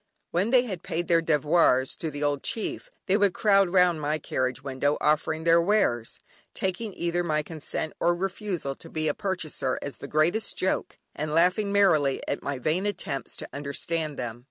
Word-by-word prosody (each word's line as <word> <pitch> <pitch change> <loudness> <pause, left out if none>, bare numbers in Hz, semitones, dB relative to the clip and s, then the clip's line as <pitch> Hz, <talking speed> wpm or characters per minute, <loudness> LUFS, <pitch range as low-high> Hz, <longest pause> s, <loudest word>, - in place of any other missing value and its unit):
When 185 +6 +1
they 250 0 +5
had 190 -8 -5
paid 170 +1 -3
their 165 -1 +4
devoirs 150 -4 +3
to 160 - -3
the 145 0 -5
old 145 -1 0
chief, 230 - -3 0.2
they 195 - +3
would 200 -3 +3
crowd 195 -3 +4
round 180 -3 +3
my 150 +1 0
carriage 130 -2 -2
window 140 +2 0
offering 155 +1 +1
their 170 0 +5
wares, 170 - +1 0.4
taking 190 +3 -2
either 175 +1 -1
my 155 -3 0
consent 155 0 -4
or 175 0 +3
refusal 190 -5 -3
to 165 - -12
be 155 -1 -2
a 150 - +2
purchaser 170 -10 -2
as 140 - -5
the 140 - -8
greatest 165 +9 +1
joke, 190 - -1 0.2
and 150 +1 -3
laughing 180 +5 +3
merrily 155 -9 +3
at - - -2
my 140 -1 -3
vain 160 +10 0
attempts 140 -9 -4
to - - -7
understand 150 +2 -3
them. 120 -2 -5
165 Hz, 180 wpm, -27 LUFS, 145-190 Hz, 0.4 s, they